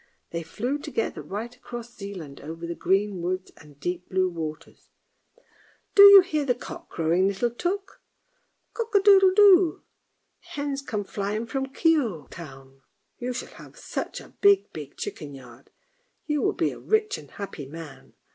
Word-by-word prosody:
They 170 - -3
flew 240 - -3
together 285 -7 -3
right 225 +5 -6
across 240 -1 -9
Zealand, 185 -9 -8
over 165 +3 -7
the 170 - -3
green 195 +2 0
woods 185 +2 -3
and 145 -2 -17
deep 175 +2 -4
blue 185 0 +1
waters. 160 -1 -7 0.5
" - - -33
Do 400 - +7
you 400 -1 +12
hear 310 -5 -1
the 250 -3 +1
cock - - -9
crowing, 170 +4 +1
little 200 +5 0
Tuk? 380 - -4 0.7
Cock 455 -2 -4
a - - +8
doodle 390 -1 +7
doo. 385 -5 +6 0.6
The - - -23
hens 285 -1 -3
come 215 -7 -3
flying 205 +2 -3
up 235 - -11
from 270 +1 -2
Kioge 270 - +1
town. 135 -5 -12 0.4
You 250 +1 -3
shall 250 - -5
have - - -16
such - - -5
a - - -15
big, 400 -1 +4
big - - -9
chicken 150 - -6
yard. 125 -1 -14 0.6
You 300 -1 0
will - - +1
be - - 0
a - - -10
rich 435 -1 0
and - - -14
happy 180 -8 -7
man! 150 -2 -11
210 Hz, 170 wpm, -26 LUFS, -, 0.7 s, you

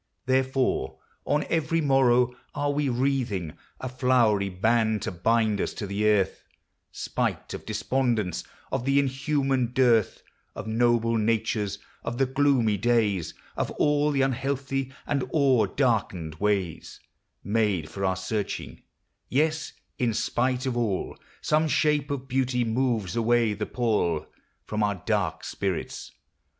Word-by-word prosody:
Therefore, 130 0 +1 0.3
on 150 +1 +1
every 165 0 +1
morrow, 125 -4 +3 0.2
are 145 0 0
we 145 -1 0
wreathing 120 - -1 0.3
A 130 - -4
flowery 120 -6 +2
band 110 +3 +1
to - - -2
bind 110 +3 +1
us - - -3
to 105 - -4
the 100 +2 0
earth, 105 -3 +2 0.5
Spite - - -2
of - - -8
despondence, 110 -3 0 0.3
of 135 -2 -1
the 135 +2 +2
inhuman 135 -2 +1
dearth 120 -5 +3 0.3
Of - - -6
noble 115 0 +2
natures, 105 -2 0 0.3
of 115 +1 -4
the 135 - +3
gloomy 130 -5 +2
days, 105 -5 +1 0.2
Of - - -1
all 150 0 +3
the 140 -2 +2
unhealthy 135 0 -1
and 140 -3 -1
o'er 130 -8 +4
darkened 100 - 0
ways 100 -5 -1 0.4
Made 100 -6 +1
for 100 - -6
our 95 -1 +2
searching: 100 +2 -4 0.5
yes, 155 +4 0 0.3
in 115 -3 +1
spite 125 +3 0
of 130 -2 -1
all, 110 -6 -1 0.3
Some 155 +1 +2
shape 150 -1 +2
of 135 -2 -4
beauty 130 -2 +1
moves 115 -5 0
away 115 -1 +2
the 105 +1 -4
pall 105 -10 0 0.4
From 105 0 -2
our 105 -1 +1
dark 90 - -1
spirits. 95 -4 -4
120 Hz, 135 wpm, -26 LUFS, 105-135 Hz, 0.5 s, o'er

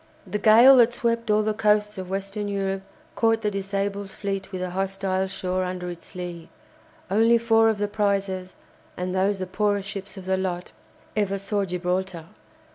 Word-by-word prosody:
The 210 - -3
gale 235 +6 +8
that 240 0 +5
swept 230 -1 -1
all 210 0 +4
the 215 0 0
coasts 210 -1 +1
of 185 -1 -6
Western 195 +2 -3
Europe 195 -1 -2 0.3
caught 225 0 +2
the 210 - +1
disabled 200 0 -3
fleet 195 -1 -4
with 185 -1 -4
the 185 -1 -3
hostile 190 0 -1
shore 185 -1 -2
under 180 -1 -4
its 175 +1 -12
lee. 175 -2 -6 0.6
Only 225 +3 +5
four 225 -1 +4
of 220 - 0
the 205 0 0
prizes, 200 -3 -1 0.4
and 180 0 -3
those 195 +2 +1
the 185 - -3
poorest 200 +1 0
ships 195 0 -7
of 190 - -8
the 190 0 +1
lot, 180 -1 -3 0.4
ever 200 -2 0
saw 200 +1 -1
Gibraltar. 180 -1 -2
195 Hz, 175 wpm, -25 LUFS, 185-210 Hz, 0.6 s, gale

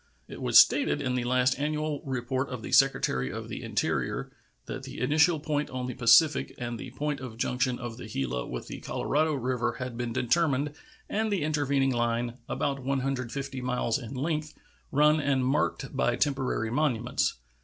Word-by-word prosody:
It - - -9
was - - +4
stated - - +6
in 130 - -1
the 125 -1 -1
last 125 +2 +2
annual 150 0 -1
report 130 0 -2
of 125 -3 -6
the - - -6
Secretary 65 - +3
of - - -6
the - - -5
Interior - - -1 0.3
that - - -5
the - - -8
initial 155 +5 +3
point 150 -1 -1
on 130 -1 -4
the 125 - -4
Pacific 125 +6 +4
and 120 -2 -4
the - - -7
point 145 +3 -3
of 125 -4 -8
junction 125 +1 0
of 120 -2 -6
the 125 - -8
Gila 65 - -3
with 60 - -6
the - - -7
Colorado 155 +1 0
River 125 -2 -1
had 130 -4 -6
been 120 -1 -2
determined 145 +3 +1 0.4
and 220 +1 -1
the 190 -6 0
intervening 140 -3 +1
line, 120 0 -1
about 140 -2 -2
150 135 -1 -2
miles 125 -1 0
in 125 +1 -8
length, 155 +3 -2 0.4
run 150 +2 +4
and 140 -3 +1
marked 135 0 0
by 120 -2 +2
temporary 130 -6 0
monuments. 125 -4 0
130 Hz, 175 wpm, -28 LUFS, 120-145 Hz, 0.4 s, stated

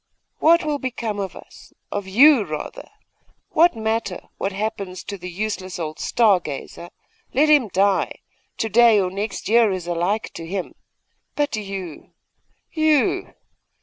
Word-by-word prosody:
'What 335 +3 +5
will 295 -2 -1
become 235 -5 -3
of 195 -2 -4
us, - - -15 0.2
of 205 -2 -3
you, 255 +5 +6
rather? 170 - -7 0.6
What 335 -2 +4
matter 220 -4 -3
what 195 - -1
happens 200 -2 -4
to 200 - -6
the 180 -1 -8
useless 190 0 -4
old 155 -2 -5
star 215 -6 +3
gazer? 160 +2 -7 0.5
Let 300 +4 +4
him 290 -6 +5
die! 195 0 +1 0.4
To 225 - -1
day 230 -1 +6
or 185 -2 0
next 200 +2 -4
year 230 0 +5
is 185 -2 -4
alike 175 +5 -1
to 165 - -8
him. 185 +1 -4 0.6
But 290 -4 0
you, 195 -6 -7 0.6
you! 310 -3 +1
205 Hz, 145 wpm, -22 LUFS, 185-240 Hz, 0.6 s, you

